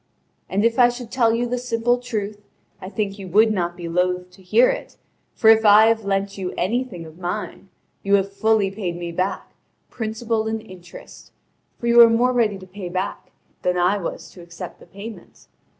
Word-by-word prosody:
And 200 Hz, +3 st, +1 dB
if 230 Hz, +1 st, +1 dB
I 245 Hz, -1 st, +7 dB
should 245 Hz, -1 st, -8 dB
tell 235 Hz, -3 st, +3 dB
you 240 Hz, +1 st, 0 dB
the 245 Hz, +1 st, -2 dB
simple 240 Hz, 0 st, 0 dB
truth, 215 Hz, -4 st, -4 dB, 0.4 s
I 185 Hz, -, -7 dB
think 205 Hz, -1 st, -3 dB
you 190 Hz, -, -7 dB
would 215 Hz, +5 st, +4 dB
not 175 Hz, -3 st, -2 dB
be 175 Hz, -1 st, -6 dB
loath 180 Hz, +1 st, -1 dB
to 190 Hz, -, -18 dB
hear 470 Hz, -, +4 dB
it, -, -, -7 dB, 0.4 s
for 220 Hz, -, +1 dB
if 220 Hz, 0 st, +4 dB
I 210 Hz, +1 st, +7 dB
have 225 Hz, -1 st, +1 dB
lent 195 Hz, 0 st, -1 dB
you 185 Hz, -1 st, -4 dB
anything 210 Hz, -3 st, -2 dB
of 160 Hz, +2 st, -14 dB
mine, 185 Hz, +2 st, -5 dB, 0.3 s
you 200 Hz, 0 st, +3 dB
have 195 Hz, 0 st, 0 dB
fully 215 Hz, -1 st, +2 dB
paid 190 Hz, -4 st, -4 dB
me 175 Hz, -1 st, -5 dB
back, 185 Hz, +3 st, -3 dB, 0.4 s
principal 220 Hz, 0 st, -2 dB
and 220 Hz, 0 st, -2 dB
interest; 180 Hz, -4 st, -13 dB, 0.5 s
for -, -, -7 dB
you 235 Hz, 0 st, +3 dB
were 235 Hz, -1 st, +10 dB
more 245 Hz, +2 st, +2 dB
ready 220 Hz, -5 st, +1 dB
to 190 Hz, -, -12 dB
pay 185 Hz, -1 st, -8 dB
back 185 Hz, +2 st, -4 dB, 0.3 s
than 180 Hz, 0 st, 0 dB
I 180 Hz, +4 st, +2 dB
was 170 Hz, -, -6 dB
to 180 Hz, -, -13 dB
accept 170 Hz, 0 st, -9 dB
the -, -, -16 dB
payment. 210 Hz, +3 st, -11 dB
205 Hz, 200 wpm, -22 LUFS, 185-230 Hz, 0.5 s, were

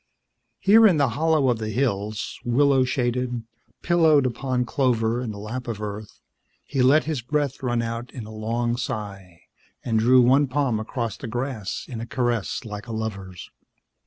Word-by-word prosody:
Here 220 Hz, +3 st, +6 dB
in 180 Hz, -6 st, +3 dB
the 140 Hz, -3 st, +3 dB
hollow 155 Hz, +3 st, +2 dB
of 120 Hz, -2 st, +1 dB
the 110 Hz, -1 st, -3 dB
hills, 110 Hz, -4 st, -2 dB
willow 135 Hz, +2 st, +3 dB
shaded, 125 Hz, -1 st, -1 dB, 0.4 s
pillowed 160 Hz, -5 st, +4 dB
upon 125 Hz, 0 st, -1 dB
clover 120 Hz, -3 st, +1 dB
and 120 Hz, -3 st, -4 dB
the 105 Hz, -, -8 dB
lap 115 Hz, +5 st, -6 dB
of 115 Hz, -3 st, -4 dB
Earth, 105 Hz, 0 st, -7 dB, 0.4 s
he 135 Hz, -2 st, -2 dB
let 140 Hz, +5 st, +5 dB
his 150 Hz, -5 st, -3 dB
breath 145 Hz, +2 st, -2 dB
run 120 Hz, -2 st, 0 dB
out 115 Hz, +1 st, -4 dB
in 120 Hz, -4 st, -7 dB
a 110 Hz, -, -10 dB
long 120 Hz, +2 st, -1 dB
sigh 100 Hz, -8 st, -6 dB, 0.4 s
and 115 Hz, -2 st, +1 dB
drew 125 Hz, +3 st, +5 dB
one 135 Hz, +4 st, +4 dB
palm 130 Hz, -4 st, 0 dB
across 115 Hz, -1 st, -4 dB
the 135 Hz, -, -7 dB
grass 120 Hz, -4 st, -4 dB
in 115 Hz, -4 st, -6 dB
a 115 Hz, -, -6 dB
caress 120 Hz, -2 st, -1 dB
like 105 Hz, +1 st, -7 dB
a -, -, -6 dB
lover's. 100 Hz, -5 st, -6 dB
120 Hz, 170 wpm, -24 LUFS, 110-135 Hz, 0.4 s, Here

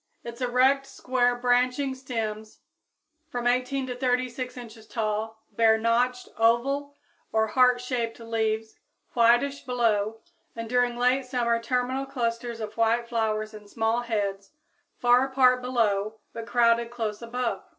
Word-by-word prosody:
_ -, -, -8 dB
Its 235 Hz, +1 st, -8 dB
erect, 260 Hz, +2 st, +3 dB
square, 250 Hz, -2 st, 0 dB
branching 250 Hz, +2 st, +1 dB
stems, 220 Hz, -5 st, -5 dB, 0.7 s
from 245 Hz, -4 st, -4 dB
18 255 Hz, +2 st, +1 dB
to 250 Hz, -1 st, -5 dB
36 250 Hz, 0 st, -1 dB
inches 225 Hz, -2 st, -11 dB
tall, 220 Hz, 0 st, -3 dB
bear 225 Hz, -1 st, +4 dB
notched 245 Hz, +2 st, +1 dB
oval 275 Hz, +5 st, +2 dB, 0.4 s
or 220 Hz, 0 st, +1 dB
heartshaped 250 Hz, -1 st, +1 dB
leaves, 220 Hz, -1 st, -2 dB, 0.3 s
whitish 240 Hz, +4 st, +3 dB
below, 225 Hz, -4 st, 0 dB, 0.4 s
and 230 Hz, 0 st, -5 dB
during 245 Hz, 0 st, +1 dB
late 250 Hz, +2 st, +2 dB
summer 235 Hz, -2 st, 0 dB
terminal 250 Hz, +3 st, -1 dB
clusters 235 Hz, -3 st, -3 dB
of 215 Hz, -1 st, -6 dB
white 230 Hz, +1 st, +2 dB
flowers 215 Hz, -2 st, -1 dB
in 210 Hz, -1 st, -11 dB
small 225 Hz, +2 st, 0 dB
heads, 205 Hz, -1 st, -3 dB, 0.4 s
far 245 Hz, +1 st, +4 dB
apart 255 Hz, -1 st, +4 dB
below, 220 Hz, -4 st, 0 dB, 0.2 s
but 230 Hz, -1 st, -7 dB
crowded 235 Hz, -1 st, +3 dB
close 225 Hz, -3 st, -4 dB
above. 240 Hz, +1 st, -3 dB
240 Hz, 130 wpm, -26 LUFS, 225-250 Hz, 0.7 s, bear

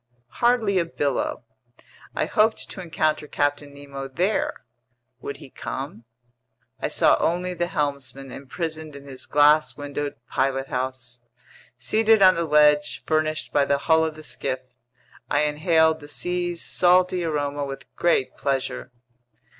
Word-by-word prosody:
Hardly 235 Hz, -5 st, +3 dB
a 170 Hz, -, +1 dB
billow. 145 Hz, -5 st, -2 dB, 0.7 s
I -, -, +1 dB
hoped 220 Hz, +1 st, +1 dB
to 190 Hz, -, -6 dB
encounter 155 Hz, -3 st, -1 dB
Captain 145 Hz, 0 st, -1 dB
Nemo 140 Hz, -1 st, -8 dB
there—would 135 Hz, -, -4 dB
he 135 Hz, -, -13 dB
come? 135 Hz, -4 st, -6 dB, 0.7 s
I -, -, -1 dB
saw -, -, +4 dB
only 180 Hz, +2 st, 0 dB
the 175 Hz, 0 st, -1 dB
helmsman 140 Hz, -5 st, -3 dB
imprisoned 155 Hz, +2 st, -5 dB
in 140 Hz, 0 st, -11 dB
his 135 Hz, -2 st, -10 dB
glass 150 Hz, +1 st, +4 dB
windowed 145 Hz, 0 st, -4 dB
pilothouse. 130 Hz, -2 st, -2 dB, 0.6 s
Seated 215 Hz, -, +3 dB
on 185 Hz, -1 st, +8 dB
the 170 Hz, -1 st, -1 dB
ledge 150 Hz, -1 st, +3 dB
furnished 155 Hz, 0 st, 0 dB
by 145 Hz, -, +4 dB
the 140 Hz, 0 st, +2 dB
hull 160 Hz, +3 st, +3 dB
of 160 Hz, -1 st, -2 dB
the 155 Hz, -, -11 dB
skiff, 130 Hz, -3 st, -3 dB, 0.7 s
I 145 Hz, +1 st, +2 dB
inhaled 160 Hz, +1 st, +3 dB
the 145 Hz, -, -12 dB
sea's 175 Hz, +2 st, -2 dB
salty 180 Hz, 0 st, +3 dB
aroma 145 Hz, -3 st, -1 dB
with 135 Hz, -1 st, -6 dB
great 170 Hz, -6 st, +1 dB
pleasure. 135 Hz, -1 st, -2 dB
150 Hz, 130 wpm, -24 LUFS, 140-170 Hz, 0.7 s, on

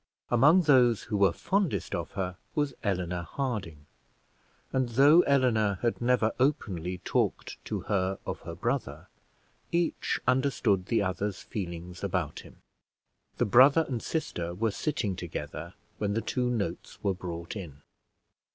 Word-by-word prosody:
Among 150 Hz, +10 st, +6 dB
those 125 Hz, -7 st, +4 dB
who 105 Hz, -, -2 dB
were 100 Hz, -3 st, +5 dB
fondest 180 Hz, -, -1 dB
of -, -, -4 dB
her 90 Hz, -2 st, -3 dB, 0.2 s
was 145 Hz, -2 st, 0 dB
Eleanor 90 Hz, -3 st, -1 dB
Harding; 95 Hz, -, -4 dB, 0.9 s
and 130 Hz, -2 st, +1 dB
though 140 Hz, +8 st, +6 dB
Eleanor 110 Hz, -8 st, +3 dB
had 120 Hz, 0 st, 0 dB
never 120 Hz, -2 st, +3 dB
openly 95 Hz, -, 0 dB
talked -, -, -1 dB
to -, -, -3 dB
her 95 Hz, -1 st, 0 dB
of -, -, -4 dB
her 85 Hz, 0 st, -8 dB
brother, 90 Hz, -, -3 dB, 0.6 s
each 170 Hz, 0 st, 0 dB
understood 125 Hz, -7 st, +2 dB
the 115 Hz, -3 st, +2 dB
other's 100 Hz, +1 st, -2 dB
feelings 90 Hz, -2 st, -6 dB
about 90 Hz, -6 st, -2 dB
him. -, -, -14 dB, 0.8 s
The -, -, +2 dB
brother 135 Hz, +9 st, +6 dB
and 125 Hz, -4 st, -3 dB
sister 85 Hz, -, -3 dB
were 110 Hz, +3 st, 0 dB
sitting 105 Hz, -, -2 dB
together 90 Hz, -2 st, -6 dB, 0.2 s
when 100 Hz, -1 st, -1 dB
the 115 Hz, -, +1 dB
two 125 Hz, +1 st, -1 dB
notes 115 Hz, -5 st, -3 dB
were 100 Hz, -2 st, +2 dB
brought 85 Hz, -1 st, -6 dB
in. 75 Hz, -8 st, -8 dB
105 Hz, 140 wpm, -29 LUFS, 90-130 Hz, 0.9 s, Among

